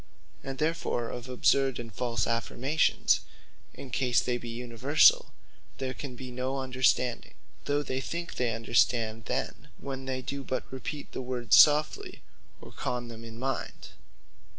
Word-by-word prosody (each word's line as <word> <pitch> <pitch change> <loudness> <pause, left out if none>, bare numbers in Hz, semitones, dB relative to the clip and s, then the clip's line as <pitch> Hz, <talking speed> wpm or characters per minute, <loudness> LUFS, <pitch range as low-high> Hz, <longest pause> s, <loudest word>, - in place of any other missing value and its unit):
And 135 0 -5
therefore 155 -6 -1
of 125 +1 -7
absurd 135 +1 +2
and 115 -2 -8
false 115 0 -1
affirmations, 120 +6 +1 0.6
in 135 - -9
case 125 -1 +2
they 120 -1 -1
be 120 - -8
universall, 125 +5 +4 0.5
there 130 -1 -3
can 135 -2 -7
be 130 0 -8
no 130 +2 -2
Understanding; 130 -2 0 0.3
though 145 0 0
many 130 0 -2
think 170 +4 -4
they 125 -2 0
understand, 115 -1 +1
then, - - -3
when 135 -1 -6
they 130 -1 -3
do 140 +1 -4
but 130 0 -2
repeat 135 +3 -6
the - - -4
words 125 -3 +2
softly, 150 +1 +4 0.4
or - - -11
con 120 -1 -3
them 115 0 -9
in 115 -1 -9
their 130 - -2
mind. 135 - -4
130 Hz, 150 wpm, -29 LUFS, 120-135 Hz, 0.6 s, universall